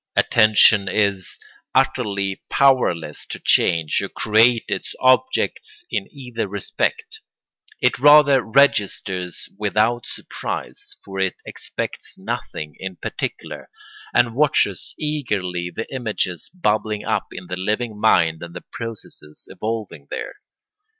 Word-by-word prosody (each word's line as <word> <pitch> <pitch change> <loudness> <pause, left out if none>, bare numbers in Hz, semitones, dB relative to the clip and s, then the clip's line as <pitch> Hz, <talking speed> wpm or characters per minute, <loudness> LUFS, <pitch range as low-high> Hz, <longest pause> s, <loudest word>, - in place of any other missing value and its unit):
Attention 110 -2 +5
is 100 -1 0 0.4
utterly 105 -8 0
powerless 120 - +2
to - - -5
change 80 -3 +3
or - - -4
create 115 +2 +3
its 100 -2 -3
objects 260 - +1
in 195 - -2
either 125 -6 -5
respect; 445 - -2 0.6
it - - +2
rather 145 -2 +7
registers 100 -7 +1
without 110 +3 +1
surprise—for 410 - -6
it 95 -1 0
expects - - -6
nothing 75 -1 -5
in 95 -1 -6
particular—and 120 +5 -3
watches 130 - +1
eagerly 100 - -2
the 110 +5 -5
images 110 - -3
bubbling 105 - -1
up - - -1
in - - -8
the 90 - -4
living 105 +3 -2
mind 80 -7 +3
and 85 0 -9
the 90 - -8
processes 110 -9 -8
evolving 105 -10 -5
there. - - -5
110 Hz, 110 wpm, -21 LUFS, 95-130 Hz, 0.6 s, rather